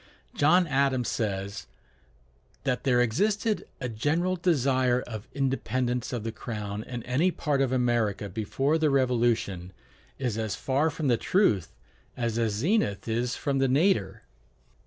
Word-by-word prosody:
John 175 +5 +4
Adams 135 -4 +1
says, 100 -2 -3 1.0
"That 125 -1 -1
there 125 -2 +4
existed 205 - 0
a 125 - -3
general 155 +11 0
desire 130 -7 +2
of 110 -1 -8
independence 130 -2 -1
of 120 -4 -3
the 115 - -3
Crown 105 -2 -5
in 120 -1 -6
any 140 +9 +2
part 150 -5 -1
of 135 -2 +1
America 120 -5 +1
before 135 - 0
the 155 -1 +3
Revolution, 120 -9 +1 0.5
is 120 -5 -2
as 110 -2 -2
far 140 +4 +1
from 155 -1 -3
the 120 -3 +3
truth 110 - +1 0.4
as 115 -2 -1
the 115 -1 +2
zenith 105 - 0
is 120 +2 -1
from 140 -2 -1
the 135 - +3
nadir." 140 - +1
125 Hz, 140 wpm, -27 LUFS, 110-145 Hz, 1.0 s, John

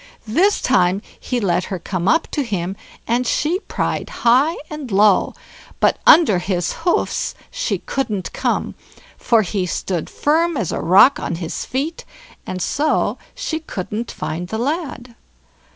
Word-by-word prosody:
This 365 - +2
time 190 -4 +2 0.2
he 250 - -2
let 180 -4 +1
her 190 - -4
come 180 +1 -3
up 325 +7 +3
to 295 - 0
him, 195 -7 -3 0.3
and 240 +1 +1
she 325 +9 +1
pried - - -3
high 260 +8 +3
and 300 -6 -7
low, 200 0 +4 0.4
but - - +3
under 220 - +7
his 175 -1 -1
hoofs 350 - -1 0.2
she - - -1
couldn't 215 -9 -3
come, - - -1 0.4
for 230 -2 +2
he 185 0 -2
stood 175 -1 -3
firm 325 +2 +1
as 205 -9 -1
a - - -2
rock 190 +11 +6
on - - -3
his 165 -1 -4
feet, 290 +6 -3 0.4
and 185 -1 -3
so 300 +2 0 0.2
she 350 -10 -3
couldn't 215 - -5
find 175 +3 -4
the 220 - -4
lad. 260 -2 -3
230 Hz, 150 wpm, -20 LUFS, 185-300 Hz, 0.4 s, under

